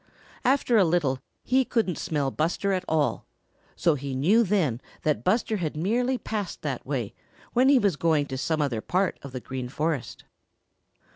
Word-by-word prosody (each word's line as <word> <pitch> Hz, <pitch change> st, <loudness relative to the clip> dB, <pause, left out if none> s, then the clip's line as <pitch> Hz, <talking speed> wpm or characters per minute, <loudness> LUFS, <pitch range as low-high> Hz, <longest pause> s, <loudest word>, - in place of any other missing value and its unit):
After 255 Hz, -2 st, +3 dB
a -, -, +6 dB
little 160 Hz, -7 st, +1 dB, 0.2 s
he 260 Hz, +1 st, +3 dB
couldn't 220 Hz, -8 st, 0 dB
smell 145 Hz, -4 st, -1 dB
Buster 175 Hz, +7 st, 0 dB
at 185 Hz, -1 st, -1 dB
all, 155 Hz, -2 st, 0 dB, 0.5 s
so 170 Hz, -, +3 dB
he 140 Hz, -2 st, -4 dB
knew 185 Hz, -, +4 dB
then 170 Hz, -, +1 dB, 0.2 s
that 150 Hz, -8 st, 0 dB
Buster 220 Hz, -, +1 dB
had 155 Hz, -5 st, -3 dB
merely 245 Hz, +9 st, +1 dB
passed 215 Hz, -5 st, -4 dB
that -, -, -3 dB
way -, -, -2 dB, 0.4 s
when 255 Hz, +2 st, +4 dB
he 280 Hz, -, +7 dB
was 200 Hz, -9 st, +2 dB
going 155 Hz, -3 st, +2 dB
to 135 Hz, -, -5 dB
some 155 Hz, +2 st, 0 dB
other 120 Hz, -6 st, -1 dB
part 185 Hz, -, 0 dB
of 140 Hz, -, -9 dB
the 130 Hz, -, -5 dB
Green 130 Hz, 0 st, -5 dB
Forest. 150 Hz, 0 st, -2 dB
165 Hz, 170 wpm, -26 LUFS, 140-210 Hz, 0.5 s, he